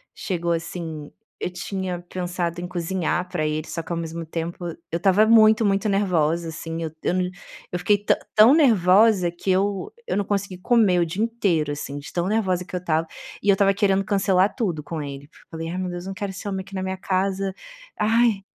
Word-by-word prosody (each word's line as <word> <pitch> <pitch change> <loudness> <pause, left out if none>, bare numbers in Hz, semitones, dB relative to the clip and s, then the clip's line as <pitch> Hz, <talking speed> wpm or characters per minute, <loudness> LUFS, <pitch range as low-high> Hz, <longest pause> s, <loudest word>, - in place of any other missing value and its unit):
chegou 175 -3 -2
assim, 165 -3 -5 0.3
eu - - -2
tinha 180 0 -4
pensado 175 -1 -3
em 180 - -4
cozinhar 180 0 -1
pra 170 -4 -1
ele, 155 +1 -2
só 165 - -4
que - - -10
ao 170 - -1
mesmo 165 0 -5
tempo, 170 +2 -5 0.3
eu 165 - 0
estava 195 +4 +4
muito, 220 -1 +6
muito 200 +2 +1
nervosa, 170 -4 +1
assim, 165 +1 -5
eu 160 - -4
eu - - +1
não 180 -1 0 0.4
eu 180 - -2
fiquei 205 +3 +3
tã - - +4 0.2
tão 220 +6 +8
nervosa, 205 - +5
que 175 +2 -6
eu 195 0 0 0.2
eu - - -1
não 205 - +1
consegui 200 -2 -2
comer 205 -4 +3
o 170 - +3
dia 185 +6 -2
inteiro, 190 -10 0
assim, 145 -1 -6
de 145 - -11
tão 175 0 0
nervosa 190 -4 +1
que - - -8
eu - - 0
estava. 165 -2 0 0.4
E 205 - +1
eu - - +8
estava 195 0 +3
querendo 195 -1 +2
cancelar 195 -1 +2
tudo 175 - -2
com 160 +1 -5
ele. 140 -1 -7 0.2
Falei: 165 0 -5
"Ai, 175 - -4
meu 185 -1 -2
Deus, 175 0 -6
não 195 - -4
quero 200 -1 -4
ser 200 +2 -6
homem 190 -1 -2
aqui 195 - -11
na 190 - -2
minha 190 0 -3
casa". 190 +1 -1 0.5
Ai. 225 -2 +3
185 Hz, 210 wpm, -23 LUFS, 170-200 Hz, 0.5 s, tão